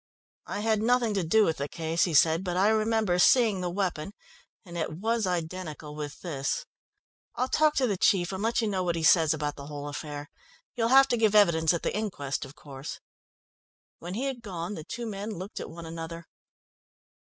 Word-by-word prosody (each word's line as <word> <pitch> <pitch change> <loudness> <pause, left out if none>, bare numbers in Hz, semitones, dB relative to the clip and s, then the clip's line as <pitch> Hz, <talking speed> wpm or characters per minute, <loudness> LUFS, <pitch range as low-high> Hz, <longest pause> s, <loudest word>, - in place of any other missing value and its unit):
"I 205 - -3
had 220 -1 +1
nothing 240 -1 +2
to 195 -3 0
do 210 +6 +4
with 160 -3 0
the 140 +1 -3
case," 165 0 0
he 170 -4 -2
said, 160 +4 +4
"but 180 -1 -2
I 195 +3 +4
remember 220 -4 +2
seeing 215 -1 +5
the 180 - -1
weapon, 180 -1 -2 0.5
and 175 -2 -10
it 160 -2 -2
was 220 +4 0
identical 165 -3 -4
with 145 -1 -6
this. 145 -6 -2 0.7
I'll 255 - 0
talk 305 +2 +3
to 265 - +3
the 205 -6 0
chief 175 -1 +3
and 190 0 -4
let 230 +2 +1
you 225 - 0
know 195 -3 -1
what 175 -2 0
he 165 - -3
says 160 -1 +5
about 150 -2 -2
the 140 0 -8
whole 145 -1 -6
affair. 145 0 -6 0.4
You'll 230 -1 +1
have 270 +2 +7
to 240 - +2
give 220 -2 +3
evidence 165 -6 +5
at 170 - -2
the - - -1
inquest 165 -11 -3
of 135 +2 -13
course." 135 -1 -8 1.0
When 175 +2 -6
he 240 - -2
had 265 -3 -3
gone 180 -3 -5
the 160 - -7
two 235 +8 -6
men 205 -1 -5
looked 190 +4 -7
at - - -6
one 170 0 -9
another. 165 +1 -7
180 Hz, 205 wpm, -28 LUFS, 160-215 Hz, 1.0 s, have